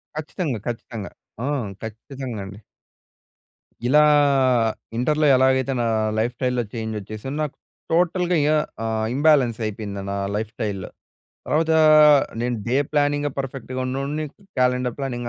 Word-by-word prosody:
ఖచ్చితంగా, 155 Hz, -, -3 dB
ఖచ్చితంగా 115 Hz, -3 st, -5 dB, 0.3 s
ఆ! -, -, -1 dB, 0.4 s
ఖచ్చితంగా 120 Hz, +2 st, -7 dB
అండి. 100 Hz, +1 st, -10 dB, 1.3 s
ఇలా 150 Hz, +5 st, +5 dB, 0.9 s
ఇంటర్‌‌లో 150 Hz, +5 st, +1 dB
ఎలాగైతే 130 Hz, 0 st, +3 dB
నా -, -, 0 dB, 0.3 s
లైఫ్ 120 Hz, +2 st, 0 dB
స్టైల్‌లో 125 Hz, -1 st, 0 dB
చేంజ్ 110 Hz, -1 st, -4 dB
వచ్చేసిందో, 110 Hz, +7 st, -7 dB
నాకు 145 Hz, -, -4 dB, 0.4 s
టోటల్‌గా 180 Hz, +1 st, +2 dB
ఇగ 150 Hz, +1 st, +2 dB, 0.3 s
ఆహ్, 110 Hz, -1 st, -1 dB
ఇంబ్యాలెన్స్ 140 Hz, -6 st, +3 dB
అయిపోయింది 100 Hz, -2 st, -5 dB
నా -, -, -2 dB, 0.2 s
లైఫ్ 110 Hz, 0 st, -2 dB
స్టైల్‌. 100 Hz, -3 st, -3 dB, 0.6 s
తర్వాత 160 Hz, +1 st, +1 dB, 0.7 s
నేను 120 Hz, 0 st, -1 dB
డే 120 Hz, +3 st, +1 dB, 0.2 s
ప్లానింగే 145 Hz, 0 st, +1 dB
పర్‌ఫెక్ట్‌గా 130 Hz, -1 st, -5 dB
ఉన్నోడిని 140 Hz, +4 st, -2 dB, 0.3 s
క్యాలెండర్ 125 Hz, -1 st, +1 dB
ప్లానింగ్ 120 Hz, -3 st, -3 dB
125 Hz, 120 wpm, -23 LUFS, 115-145 Hz, 1.3 s, ఇలా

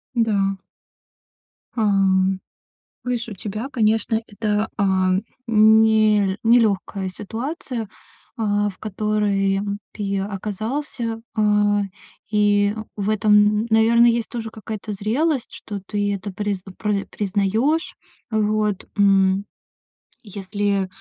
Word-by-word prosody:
Да. 200 Hz, -4 st, +1 dB, 1.2 s
А, 230 Hz, -, -1 dB
м, 195 Hz, -2 st, +2 dB, 0.6 s
видишь, 245 Hz, -2 st, -2 dB
у -, -, -6 dB
тебя, 215 Hz, +5 st, -5 dB
конечно, 220 Hz, -2 st, +1 dB
это, 210 Hz, +1 st, -1 dB
а, 190 Hz, -2 st, +2 dB, 0.4 s
нел 215 Hz, -2 st, +4 dB
нелёгкая 210 Hz, -4 st, +2 dB
ситуация, 230 Hz, -, -5 dB, 0.5 s
а, 205 Hz, -2 st, +1 dB
в 190 Hz, -, -12 dB
которой, 205 Hz, -2 st, 0 dB
а, -, -, -1 dB
м, 200 Hz, 0 st, -3 dB
ты 200 Hz, -2 st, -2 dB
оказался. 225 Hz, +4 st, -4 dB
А. 210 Hz, -1 st, +3 dB, 0.5 s
И, 205 Hz, -1 st, +3 dB
э, 220 Hz, -, -5 dB
в 205 Hz, 0 st, -2 dB
этом, 215 Hz, 0 st, +2 dB
м, 210 Hz, +2 st, +4 dB
наверное, 230 Hz, +2 st, +5 dB
есть 230 Hz, -1 st, 0 dB
тоже 230 Hz, -2 st, -5 dB
какая-то 215 Hz, -1 st, -6 dB
зрелость, 245 Hz, +8 st, -1 dB
что 205 Hz, -2 st, -7 dB
ты 205 Hz, 0 st, -1 dB
это 200 Hz, +1 st, -5 dB
приз 200 Hz, -1 st, -3 dB
пры 210 Hz, -2 st, -1 dB
признаёшь. 215 Hz, -, 0 dB, 0.4 s
Вот, 215 Hz, -2 st, 0 dB
м. 195 Hz, -1 st, +4 dB, 0.8 s
И 215 Hz, -, -14 dB
если, 200 Hz, 0 st, -1 dB
э, -, -, -11 dB
210 Hz, 115 wpm, -22 LUFS, 200-220 Hz, 1.2 s, наверное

